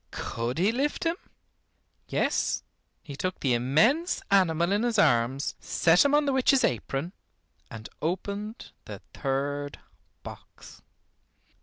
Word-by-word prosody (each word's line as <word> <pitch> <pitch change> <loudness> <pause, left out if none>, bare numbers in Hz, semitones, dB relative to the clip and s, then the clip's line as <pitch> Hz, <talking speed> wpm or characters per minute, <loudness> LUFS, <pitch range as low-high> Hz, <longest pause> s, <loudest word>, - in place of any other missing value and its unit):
Could 115 +3 -4
he 190 +6 +3
lift 275 +5 -1
him? 330 0 0 0.9
Yes, - - 0 0.4
he 145 -3 -8
took 185 +6 -3
the 130 -3 +1
immense 190 - +2
animal 170 -3 +3
in 205 +1 +2
his 235 -1 0
arms, 135 - +2
set 170 +1 +3
him 285 0 +3
on 295 0 +3
the 280 - +1
witch's 265 0 +3
apron, 135 - -2 0.6
and 110 -1 -9
opened 200 +6 -4
the - - -9
third 145 +1 -3 0.5
box. - - -12
175 Hz, 125 wpm, -27 LUFS, 135-230 Hz, 0.9 s, he